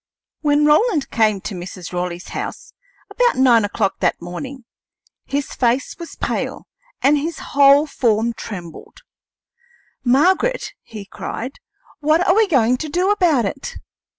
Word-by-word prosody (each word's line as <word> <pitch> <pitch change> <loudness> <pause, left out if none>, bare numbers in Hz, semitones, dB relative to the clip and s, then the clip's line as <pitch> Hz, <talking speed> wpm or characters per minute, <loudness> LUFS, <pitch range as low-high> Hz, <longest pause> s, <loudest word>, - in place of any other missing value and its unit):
When 295 -1 +2
Roland 310 - +3
came 215 -3 +2
to 210 - -5
Mrs. 180 0 -8
Raleigh's 180 0 -4
house, - - -6 0.4
about - - +2
nine 245 -4 +5
o'clock 205 -1 -1
that 180 - +1
morning, 240 +9 -7 0.6
his 280 0 -3
face 245 +2 0
was 335 - -8
pale - - -3 0.4
and 290 +2 +4
his 325 +3 -4 0.2
whole 280 +1 +6
form 235 -5 0
trembled. 180 -8 -9 1.0
"Margaret," 370 - +2
he 210 -3 -10
cried, 250 +6 -6 0.4
"what 310 +4 +2
are 360 - +5
we 440 0 +4
going 250 - +3
to 310 +3 -5
do 360 +6 +1
about 335 - +3
it? 270 +8 -5
270 Hz, 135 wpm, -20 LUFS, 215-310 Hz, 1.0 s, whole